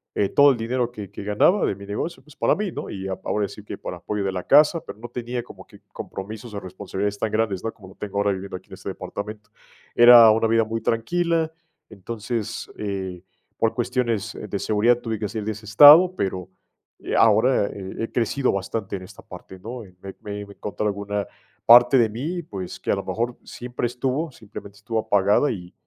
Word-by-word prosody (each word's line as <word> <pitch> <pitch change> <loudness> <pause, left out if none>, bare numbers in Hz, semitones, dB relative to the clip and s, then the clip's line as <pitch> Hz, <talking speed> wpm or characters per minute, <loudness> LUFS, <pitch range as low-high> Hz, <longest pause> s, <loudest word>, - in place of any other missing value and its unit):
Eh, 100 - +1
todo 140 0 +6
el 130 - -1
dinero 120 +1 -1
que 105 -5 -9
que - - -8
ganaba 105 - +3
de - - -1
mi 100 +1 -11
negocio, 105 +12 -4
pues, 150 - -18
para - - +2
mí, 205 -3 -3
¿no? - - -6
Y 95 -1 -6 0.2
ahora 105 -1 0
sí 105 - -11
que - - -7
para 90 - -7
apoyo 105 +3 -3
de 95 - -1
la 90 -1 -4
casa, 150 +4 +6
pero - - -10
no 120 +1 -8
tenía 120 0 -4
como - - -14
que - - -18
compromisos 110 +3 -8
o 100 - -4
responsabilidades 100 +2 -4
tan 110 - -1
grandes, 110 -4 0
¿no? 115 - -2
Como 95 -4 -15
lo 95 - -16
tengo 100 -1 -6
ahora 100 0 +2
viviendo 95 0 -5
aquí 90 - -11
en - - -12
este 95 +1 -12
departamento. 105 +3 -7 0.5
Era 120 -2 +9
una 115 +1 +2
vida 115 0 +3
muy 115 +1 -3
tranquila, 165 +8 0 0.4
entonces, 110 +2 -5
eh, 95 -3 -4 0.4
por 115 - +1
cuestiones, 115 -3 -1
eh, 105 - -7
de 100 0 -3
seguridad 115 +3 +2
tuve 115 -2 -3
que 105 - -2
salir 110 -1 -5
de 110 - -1
ese 105 +1 -12
estado, 150 - +8
pero, 95 -1 -3 0.5
eh, - - -4
ahora 110 0 +4
he 95 +2 -6
he 115 - -4
crecido 125 +3 0
bastante 100 +1 -3
en 95 - -10
esta 95 +2 -13
parte, 95 +1 -11
¿no? 120 +5 -7 0.2
Me 95 0 -8
me 105 0 -6
me 100 - -13
encontré 105 +1 -5
alguna 100 0 -2 0.4
parte 120 +2 +8
de 115 -3 +4
mí, 160 +10 -4
pues, 95 - -7
que - - -2
a - - +3
lo - - -4
mejor 120 +2 -3
siempre 125 0 -4
estuvo, 130 +6 -2
simplemente 100 -3 -11
estuvo 110 +2 -3
apagada, 105 +7 +2
y 90 -5 -8
110 Hz, 210 wpm, -23 LUFS, 100-120 Hz, 0.5 s, Era